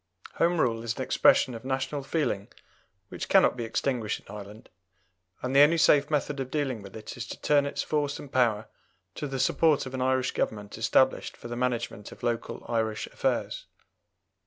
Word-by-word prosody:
Home 170 0 +2
Rule 115 -5 +1
is 115 0 -2
an 130 - -3
expression 130 0 +4
of 115 - -8
national 135 +2 -2
feeling 135 -9 -1 0.6
which - - -6
cannot - - +5
be 120 -2 -4
extinguished 115 -1 -1
in - - -11
Ireland, 105 +1 -10 0.7
and 130 +1 -2
the - - +7
only 155 +3 +6
safe 145 -2 +4
method 150 -2 -1
of 130 -1 -3
dealing 135 -6 -2
with 100 -1 -11
it 110 - -8
is 120 -1 -5
to - - -8
turn 145 -1 +3
its - - -3
force 145 -2 -1
and 140 - -10
power 115 -4 +2 0.5
to 145 - -4
the 135 -1 -4
support 150 +3 +3
of 130 - -8
an 130 - -3
Irish 130 0 +1
Government 105 -2 -3
established 130 +4 +2
for 120 - -9
the 120 - -4
management 120 -4 -2
of - - -14
local 120 -1 -3
Irish 110 -2 -1
affairs. - - -2
130 Hz, 185 wpm, -28 LUFS, 115-140 Hz, 0.7 s, the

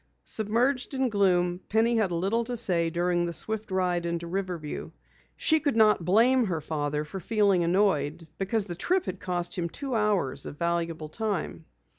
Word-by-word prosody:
Submerged 245 +5 -1
in 265 -1 +1
gloom, 180 -4 +2
Penny 225 +2 +2
had 210 -5 +1
little 195 +7 0
to 245 0 -3
say 175 -7 +2
during 175 +1 0
the 170 - -4
swift 220 +4 +1
ride 180 -2 0
into 170 0 -3
Riverview. 175 -4 -4 0.5
She 315 0 +3
could 285 -4 0
not 215 -5 +4
blame 235 +8 +4
her 175 -5 -2
father 150 -1 -2
for 190 +6 -7
feeling 200 -2 +2
annoyed, 170 -4 +1
because 200 +2 0
the 175 - -5
trip 360 - 0
had 185 0 -5
cost 175 -1 -2
him 170 -3 -2
two 275 - -5
hours 210 - 0
of 145 - -8
valuable 170 -2 -2
time. 175 - -3
185 Hz, 170 wpm, -27 LUFS, 170-220 Hz, 0.5 s, not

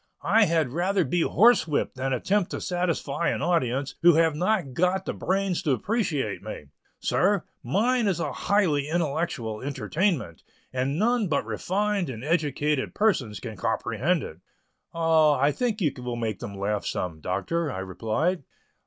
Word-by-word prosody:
I 210 +4 +5
had 160 -7 +1
rather 185 +5 +1
be 170 +5 0
horse 230 +2 +4
whipped 150 -2 -1
than 135 +1 -2
attempt 185 - +1
to - - -4
satisfy 170 -3 -1
an - - -2
audience 140 -6 0
who 175 -1 +7
have 160 -1 +3
not 180 -4 0
got 180 +6 +1
the - - -2
brains 190 -1 -1
to 145 - +1
appreciate 175 - -1
me. 75 - -8 0.3
Sir, 195 -1 +2 0.2
mine 225 - +1
is 185 -3 0
a - - -2
highly 160 -9 +1
intellectual 155 -9 -2
entertainment, 140 - -1 0.3
and 130 +3 -1
none 230 +1 +2
but 155 - 0
refined 190 - -1
and 115 -2 -6
educated 150 -2 0
persons 140 - +1
can 110 -3 -7
comprehend 170 - 0
it." 80 - -8 0.5
"Oh, 160 -2 +4
I 140 +1 +2
think 230 - -2
you 150 -6 +1
will 125 -1 -3
make 110 -4 -3
them 100 - -7
laugh 100 +1 -1
some, 80 -4 -3
Doctor," 145 - -1
I - - -5
replied. 110 - -1
160 Hz, 160 wpm, -26 LUFS, 130-185 Hz, 0.5 s, who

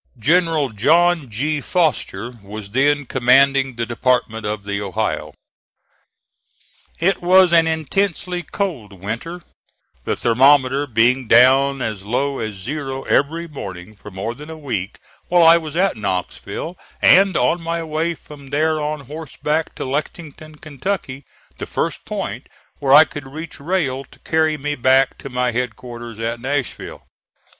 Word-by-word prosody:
General 160 +2 +2
John 160 +7 +2
G. 145 +7 -2
Foster 125 - -1
was 100 0 -9
then 145 +4 +2
commanding 135 +1 +3
the 115 0 -2
Department 115 -2 0
of 105 -1 -3
the 100 0 -3
Ohio. 95 -3 -3 1.6
It 180 +2 +1
was 180 0 +5
an 165 -1 +5
intensely 180 +2 -1
cold 155 - -4
winter, 115 - -5 0.6
the - - -1
thermometer 135 +3 +3
being 120 +1 +2
down 135 +3 +5
as 105 -3 -4
low 135 +6 -1
as 110 -2 -4
zero 135 +6 -5
every 165 +4 0
morning 100 - -8
for 105 - -12
more 100 +4 -4
than 150 +5 -11
a 160 - -8
week 110 -10 -4 0.3
while 175 -1 +4
I 165 +1 +8
was 155 -2 -8
at 190 +2 +2
Knoxville 105 - -4 0.2
and 195 0 +5
on 170 - +1
my 165 0 -3
way 160 +2 -2
from 145 -2 -14
there 155 +2 0
on 150 0 -3
horseback 155 +2 -4
to - - -5
Lexington, 155 +2 -5
Kentucky, 150 -2 -5 0.3
the - - -5
first - - -3
point - - -5 0.3
where 135 -2 0
I 150 +3 +9
could 145 -3 -9
reach 155 +4 -8
rail 140 -4 -1
to - - -20
carry 160 -1 0
me 150 +1 -3
back 130 0 +2
to 140 - -8
my 125 -1 0
headquarters 120 -1 -5
at 115 +1 -3
Nashville. 135 0 -4
140 Hz, 145 wpm, -20 LUFS, 120-160 Hz, 1.6 s, I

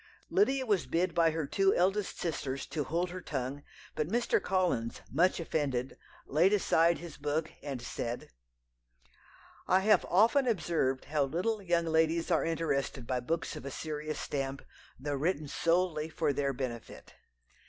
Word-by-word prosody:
"Lydia 275 -10 +3
was 200 - +1
bid 170 +7 0
by 165 -1 +4
her 160 -1 -2
two 195 +7 +2
eldest 195 +3 +1
sisters 140 -5 -3
to 150 - -3
hold 175 +4 -1
her 185 0 -6
tongue; 135 -2 -4 0.3
but 155 - -1
Mr. 235 +6 +1
Collins, 175 -12 0
much 175 +8 +3
offended, 140 -6 -1 0.3
laid 170 +8 +3
aside 170 -4 +3
his 170 -1 -9
book, 150 +2 -1
and 135 -4 -5
said 120 - -4 1.4
"'I 185 +1 +4
have 210 +2 +4
often 230 +8 +4
observed 160 - 0
how 150 -1 +1
little 185 +10 -1
young 170 -3 +1
ladies 160 +2 +2
are 165 - +3
interested 155 -6 -1
by 125 +1 -1
books 160 +7 -2
of - - -7
a 140 - -5
serious 155 +1 -4
stamp, 135 -1 -3 0.4
though 145 +2 -3
written 150 +1 0
solely 165 0 +1
for 150 -2 0
their 140 0 0
benefit. 125 -3 -6
160 Hz, 155 wpm, -31 LUFS, 140-180 Hz, 1.4 s, by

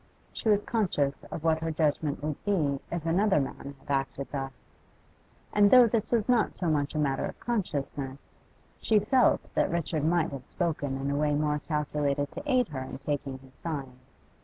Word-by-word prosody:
She 225 - -1
was 205 -1 +4
conscious 175 -11 0
of 160 - -7
what 160 -1 +3
her 165 0 -2
judgment 150 -2 0
would 150 -1 -3
be 155 -9 +1
if 170 -2 -3
another 185 +1 +3
man 140 0 -5
had 135 - -9
acted 135 0 -3
thus; 135 -2 -6 0.8
and 205 -1 +6
though 250 +1 +9
this 230 -2 0
was 230 -3 +2
not 245 -4 +2
so 175 -3 0
much 145 0 0
a - - 0
matter 140 -3 +1
of - - -9
consciousness, 140 - -3 0.4
she 220 - +3
felt 230 +5 +4
that - - +2
Richard 160 -3 -1
might 165 0 +2
have 135 -3 -8
spoken 145 -6 -2
in 135 +1 -2
a - - 0
way 150 0 +2
more 150 0 +1
calculated 145 -2 -1
to 290 -1 -4
aid 250 -3 +3
her 140 -4 -4
in 130 - -6
taking 140 -1 -3
his 130 0 -18
side. 140 -6 -5
150 Hz, 185 wpm, -28 LUFS, 140-190 Hz, 0.8 s, though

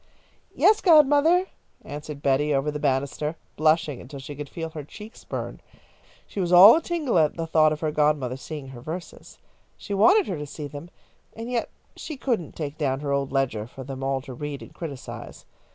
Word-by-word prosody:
"Yes, 430 0 +4
godmother," 315 +2 +5 0.4
answered 145 0 -7
Betty, 140 +2 +2
over 135 +2 0
the 150 - -5
banister, 140 +2 -1 0.2
blushing 155 -3 +2
until 140 +2 -9
she 135 +2 -8
could 145 0 -7
feel 165 +2 -5
her 155 -2 -7
cheeks 210 - -12
burn. - - -6 0.6
She - - -7
was 180 -2 0
all 185 +5 +10
a 330 - +1
tingle 310 - 0
at 155 0 +2
the 165 - -2
thought 155 -1 +4
of 150 - -3
her 155 -2 0
godmother 150 -4 +1
seeing 140 0 -8
her 125 -2 -10
verses. 170 +7 -8 0.4
She 205 - -6
wanted 365 - +5
her 175 -6 -4
to 150 - -5
see 150 +1 -7
them, 145 +4 -9 0.5
and 230 +2 -6
yet, 240 -2 -1 0.3
she 310 - -7
couldn't 235 - -2
take 150 -1 -5
down 135 -2 0
her 145 -1 -2
old 140 -1 0
ledger 125 -6 -1
for 130 +2 -10
them 135 0 -7
all 135 0 0
to 130 -1 -9
read 145 +2 -6
and - - -14
criticise. 145 -6 -8
150 Hz, 195 wpm, -25 LUFS, 140-185 Hz, 0.6 s, all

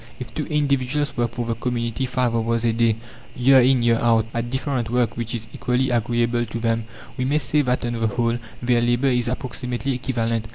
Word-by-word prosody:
If 120 -2 -7
two 150 - -3
individuals 145 -1 0
work 120 -1 0
for 120 -1 -3
the 115 - -1
community 120 +1 -2
five 125 -1 0
hours 115 0 0
a 115 - +2
day, 115 -1 +2 0.4
year 130 +2 +6
in 125 -1 +3
year 115 -1 +3
out, 115 -2 +3
at 115 0 -2
different 130 -2 -2
work 120 -1 +1
which 115 0 -3
is 115 -1 -5
equally 125 +1 0
agreeable 120 0 +1
to 115 0 -5
them, 115 -1 0 0.3
we 125 - -1
may 145 +3 +2
say 150 +1 +1
that 125 -3 0
on 120 - -2
the 115 -1 0
whole 115 +1 0 0.2
their 120 -1 +3
labour 120 +3 +2
is 125 -2 +1
approximately 125 +1 -3
equivalent. 115 -3 -1
120 Hz, 205 wpm, -22 LUFS, 115-130 Hz, 0.4 s, year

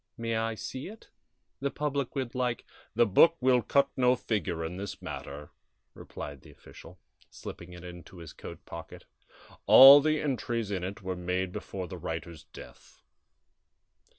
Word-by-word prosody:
May 115 0 -2
I 115 0 -1
see 130 +5 -6
it? 220 +3 -13 0.5
The 140 - -1
public 140 -2 -3
would 130 -4 -3
like 125 -2 -2
" - - -29
"The 120 +1 +5
book 165 - +5
will 125 -1 +3
cut 140 +5 +2
no 125 -1 +3
figure 90 -9 -2
in 90 +3 -6
this 100 +1 -6
matter," 75 +1 -8 0.4
replied 70 -2 -9
the - - -16
official, - - -15 0.3
slipping 85 +1 -10
it 90 -1 -11
into 90 +1 -11
his 85 -3 -10
coat - - -11
pocket; - - -10 0.6
"all 135 +2 +11
the 155 +1 +1
entries 120 -6 -2
in 95 -3 -2
it 95 +2 -6
were 95 0 -3
made 90 +1 -2
before 95 0 -6
the 90 +1 -8
writer's 80 0 -6
death." - - -15
110 Hz, 160 wpm, -29 LUFS, 90-130 Hz, 0.6 s, all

